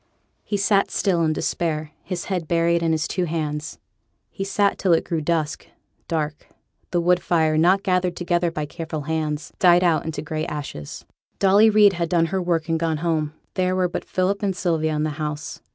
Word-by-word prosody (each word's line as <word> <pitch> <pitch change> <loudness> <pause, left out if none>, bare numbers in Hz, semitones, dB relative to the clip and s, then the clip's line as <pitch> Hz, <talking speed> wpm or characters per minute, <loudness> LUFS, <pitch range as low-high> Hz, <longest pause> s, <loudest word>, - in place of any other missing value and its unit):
He 205 - -2
sate 200 0 +2
still 180 -4 +1
in 160 - +2
despair, 155 -1 -2
his 180 -2 -5
head 180 -5 -3
buried 170 0 +2
in 165 -1 +1
his 160 0 0
two 180 - -1
hands. 155 -2 -3 0.5
He 195 - -4
sate 200 +1 +1
till 185 -3 +3
it 165 - +3
grew 165 -2 -2
dusk, 155 -1 -1 0.4
dark; 155 -2 -3 0.4
the 175 - +1
wood 175 +1 +3
fire, 160 -2 +2
not 180 +5 +4
gathered 180 -1 +1
together 175 -1 0
by 155 -2 -4
careful 155 +1 -5
hands, 155 0 -3
died 175 -1 +5
out 170 -3 +2
into 160 -1 -4
gray 155 +1 -3
ashes. 135 - -6 0.3
Dolly 200 +3 +5
Reid 210 -2 +6
had 170 -2 -2
done 170 -2 +3
her 190 - +1
work 170 -2 0
and 165 -1 0
gone 160 -1 0
home. 155 -3 0 0.2
There 185 -1 0
were 185 -1 +2
but 175 - -4
Philip 185 +2 -1
and 195 -3 0
Sylvia 160 -4 0
in 150 - 0
the 155 - -1
house. 150 -1 -4
170 Hz, 195 wpm, -23 LUFS, 155-185 Hz, 0.5 s, Reid